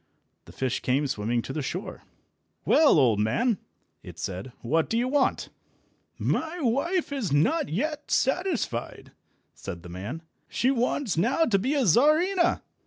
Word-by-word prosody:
The - - -13
fish 130 -2 -2
came 135 +3 0
swimming 120 -2 -1
to 135 - -6
the 155 - -2
shore. 180 +8 -5 0.6
"Well, 305 - +5
old 120 -7 +4
man!" 210 - +1 0.4
it - - -11
said, 95 +7 -5
"what 160 +7 +1
do 225 - 0
you 245 +2 +1
want?" 280 0 +1 0.7
"My 325 +2 -1
wife 290 +7 0
is 265 - -2
not 280 - +2
yet 300 - -3
satisfied," 270 - -1 0.4
said 85 -4 -8
the 90 - -10
man; 105 - -6 0.2
"she 255 - +1
wants 250 - -1
now 250 - +2
to 200 -8 +2
be 260 +9 0
a 275 -4 +2
Czarina." 315 - +3
230 Hz, 150 wpm, -26 LUFS, -, 0.7 s, Well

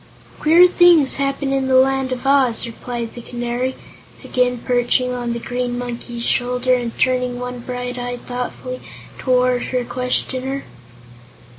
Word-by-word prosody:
"Queer 335 +4 +7
things 350 -6 +5
happen 275 0 -1
in 270 -1 0
the 260 - +3
Land 265 0 +3
of 255 +1 -4
Oz," 265 -4 +3
replied 235 0 -6
the 240 - -8
Canary, 240 +2 -3 0.5
again 250 0 +1
perching 245 +1 +1
on 240 -1 -2
the 235 - -3
Green 245 +1 -3
Monkey's 240 -1 -5
shoulder 250 0 +2
and 240 -2 -2
turning 250 -1 +1
one 250 0 -5
bright 245 +1 -5
eye 245 0 -4
thoughtfully 250 +1 -5 0.4
toward 250 -1 +2
her 250 -1 -2
questioner. 255 +2 -2
250 Hz, 140 wpm, -20 LUFS, 245-260 Hz, 0.5 s, Queer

